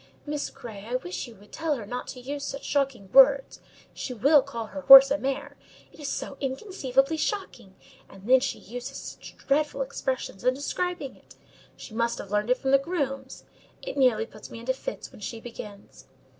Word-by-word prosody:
Miss 295 -1 -3
Grey, 225 -7 -10
I 245 - -2
wish 355 +3 -4
you 235 - -13
would 205 +1 -19
tell 320 -2 -1
her 230 -6 -7
not 245 +4 -5
to 255 - -7
use 280 +3 -5
such 275 - -5
shocking 265 -9 -1
words; 270 0 +6 0.3
she 250 - -5
will 280 +6 +5
call 235 -4 -6
her 285 +6 -7
horse 270 0 +11
a 285 - +3
mare: 270 0 -3 0.3
it - - -19
is 290 -2 -4
so 275 - -4
inconceivably 270 - 0
shocking! 310 - -4 0.3
and 195 +2 -13
then 260 +1 +7
she 265 +1 -2
uses 245 +4 -7
such - - -10
dreadful 285 0 0
expressions 260 -6 -4
in 255 +1 +3
describing 320 0 -3
it: - - -19 0.4
she 215 - -11
must 235 +1 0
have 195 - -8
learned 210 +2 0
it 250 - +4
from 265 +1 -1
the 275 - +6
grooms. 275 -4 -3 0.4
It - - -5
nearly 250 -5 +3
puts 215 -2 -13
me - - -9
into 240 +3 -1
fits - - -7
when - - -15
she 230 - -5
begins." 210 -3 -11
265 Hz, 195 wpm, -27 LUFS, 235-280 Hz, 0.4 s, horse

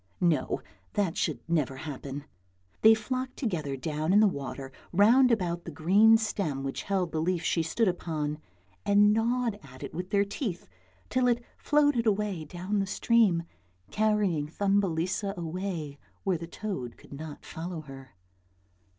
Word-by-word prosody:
No, 170 -4 +1 0.3
that 195 -5 0
should 140 -7 -1
never 150 -6 0
happen. 140 0 -6 0.6
They 220 0 +8
flocked 255 +4 -4
together 155 - -2
down 155 +4 -1
in 205 - +7
the 215 - +6
water 135 -5 -5 0.2
round 230 +8 +6
about 175 -6 0
the - - -7
green 195 +9 +5
stem 195 -11 -2
which 135 0 -3
held 190 -4 -1
the 155 - -1
leaf 175 0 0
she 170 - +1
stood 205 +8 +1
upon, 155 -4 -2 0.4
and 205 +1 +5
gnawed 230 -1 0
at 130 -2 -12
it - - -6
with 180 +2 -5
their 200 0 +3
teeth 200 - -4 0.4
till 255 -1 +3
it 240 0 +2
floated 290 -6 +2
away 200 -6 0
down 185 +6 -2
the 195 - 0
stream 205 -4 +3 0.5
carrying 210 -8 +1
Thumbelisa 195 +1 0
away 170 -4 -4 0.2
where 185 -4 +1
the 170 - -6
toad 170 - -5
could - - -14
not 150 +1 -8
follow 170 0 -5
her. 135 -5 -12
180 Hz, 150 wpm, -29 LUFS, 155-210 Hz, 0.6 s, They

